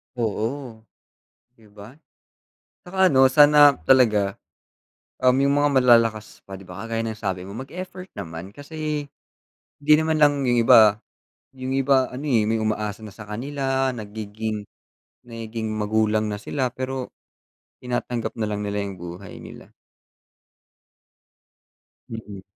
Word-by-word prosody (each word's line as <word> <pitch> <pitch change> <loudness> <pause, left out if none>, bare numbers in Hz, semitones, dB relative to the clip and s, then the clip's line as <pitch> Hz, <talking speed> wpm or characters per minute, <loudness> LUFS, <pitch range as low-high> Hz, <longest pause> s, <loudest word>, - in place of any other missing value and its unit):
Oo. 115 +2 -3 0.8
'Di 110 - -20
ba? 105 +6 -14 0.9
Tsaka 190 +1 +2
ano, 135 -5 +4
sana 145 -2 +6
talaga, 105 -7 +4 0.9
um, 130 0 +4
yung 140 +1 +2
mga 145 - +3
malalakas 115 -3 +3
pa, 95 - -7
'di 95 - -13
ba, 90 +1 -10
kagaya 115 0 -2
ng 110 - -3
sabi 95 -4 -3
mo 100 - -9
mag-effort 180 - -8
naman 90 +1 -8
kasi 150 0 -4 0.7
hindi 145 +1 +2
naman 160 0 +1
lang 145 -2 +3
yung 120 -2 +2
iba 110 -1 +7 0.6
yung 130 0 -6
iba 135 -1 +2
ano, 135 +4 -7
eh, 120 -6 +3
may 110 +1 0
umaasa 110 -1 -3
na 100 - -12
sa 110 - -10
kanila, 135 +2 -2
nagiging 105 -1 -6 0.6
nagiging 115 -1 -6
magulang 110 0 0
na 105 - -4
sila, 130 +4 -2
pero 130 +1 -5 0.7
tinatanggap 120 -1 -3
na 110 - -1
lang 105 0 -3
nila 105 0 -3
yung 100 - -6
buhay 90 +2 -9
nila. - - -13 2.4
Mm. 105 -4 -8
115 Hz, 130 wpm, -23 LUFS, 105-135 Hz, 2.4 s, iba